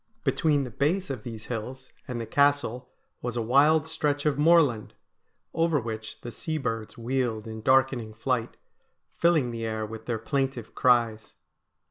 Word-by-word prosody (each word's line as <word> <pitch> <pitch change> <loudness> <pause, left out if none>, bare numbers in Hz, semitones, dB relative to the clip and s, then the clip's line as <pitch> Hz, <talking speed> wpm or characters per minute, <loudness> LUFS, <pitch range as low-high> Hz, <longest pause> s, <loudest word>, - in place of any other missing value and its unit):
Between 150 -3 +2
the 125 - -6
base 175 - 0
of 130 -5 -5
these 115 -1 -8
hills 125 +3 -6 0.2
and 125 -2 -4
the 115 - -3
Castle 140 -3 +1 0.3
was 125 -1 -3
a - - +1
wild 145 +6 +4
stretch 145 -2 -1
of 150 -2 +2
moorland, 150 -8 +3 0.6
over 165 -2 +2
which 110 -2 -6
the 120 - -7
sea 155 +7 -3
birds 115 -6 -4
wheeled 120 -2 -1
in 110 -1 -7
'darkening 130 -3 +2
flight,' 115 0 -2 0.6
filling 160 -8 +3
the 115 -1 -5
air 110 -1 -2
with 110 +1 -9
their 120 -2 0
plaintive 130 0 -2
cries. 115 -3 +2
125 Hz, 155 wpm, -27 LUFS, 115-145 Hz, 0.6 s, wild